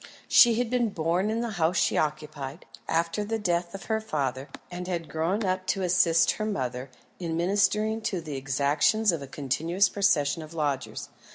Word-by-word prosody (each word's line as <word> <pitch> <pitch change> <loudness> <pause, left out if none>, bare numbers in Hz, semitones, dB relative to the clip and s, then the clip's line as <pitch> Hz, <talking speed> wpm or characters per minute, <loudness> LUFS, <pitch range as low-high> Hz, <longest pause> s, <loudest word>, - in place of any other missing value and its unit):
She 235 -3 +7
had 240 0 -1
been 245 -2 +2
born 175 +3 0
in 225 +1 -1
the 235 - -2
house 165 +3 +2
she - - +2
occupied, 150 -1 -3 0.2
after 170 +5 0
the 225 +2 -2
death 175 -3 -1
of 195 - -8
her 220 +2 -1
father, 135 - -3 0.2
and 180 0 -6
had 170 -3 -3
grown 170 +7 -1
up 185 -1 -1
to 195 - 0
assist 170 -2 +4
her 215 - -2
mother 130 - -3 0.3
in 165 -2 -3
ministering 210 +4 +1
to 185 - -2
the 155 -3 -6
exactions 145 - +2
of 165 -4 -3
a 140 - -7
continuous 165 +8 0
procession 170 -7 +1
of 155 +1 -10
lodgers. 145 -4 -2
170 Hz, 180 wpm, -27 LUFS, 150-205 Hz, 0.3 s, She